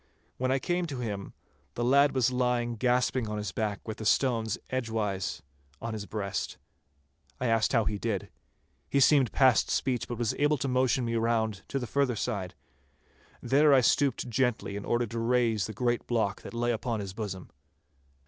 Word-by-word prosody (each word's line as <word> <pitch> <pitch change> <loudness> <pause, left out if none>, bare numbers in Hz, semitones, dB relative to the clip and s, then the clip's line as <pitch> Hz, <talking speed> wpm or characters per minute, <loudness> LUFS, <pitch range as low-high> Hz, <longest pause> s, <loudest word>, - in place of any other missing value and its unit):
When 130 0 0
I 135 - +3
came 175 +5 -1
to 140 -4 -5
him 100 -4 -4 0.4
the 120 - -2
lad 140 +3 +4
was 130 -1 +3
lying 125 -1 0
gasping 125 0 +1
on 105 - -3
his 105 -2 -3
back 105 0 -3
with 110 - -4
the 110 - -6
stones 115 -5 +2
edgewise 105 - -2 0.4
on 115 0 -4
his 105 -2 -5
breast. 100 -3 -3 0.8
I 125 - -2
asked 115 -2 +2
him - - +3
how 115 - +2
he 105 -1 -2
did. 105 -5 -3 0.6
He 140 - +2
seemed 135 -3 +5
past 130 -4 +4
speech, 125 -3 0
but 120 - -5
was 120 -3 0
able 145 +1 +3
to 135 - -2
motion 130 -1 +2
me 115 - -2
round 110 -3 0
to 140 - -3
the 125 - -2
further 130 +1 +1
side. 100 -5 -3 0.9
There 140 +4 +5
I 130 - +6
stooped 135 +1 +2
gently 120 -4 0
in 100 - -5
order 120 0 +1
to 115 +1 -5
raise 115 -3 +1
the - - -6
great 120 0 -1
block 110 -5 0
that - - -9
lay 120 +1 +1
upon 115 0 -2
his 100 -2 -5
bosom. 95 -4 -6
120 Hz, 185 wpm, -29 LUFS, 110-130 Hz, 0.9 s, I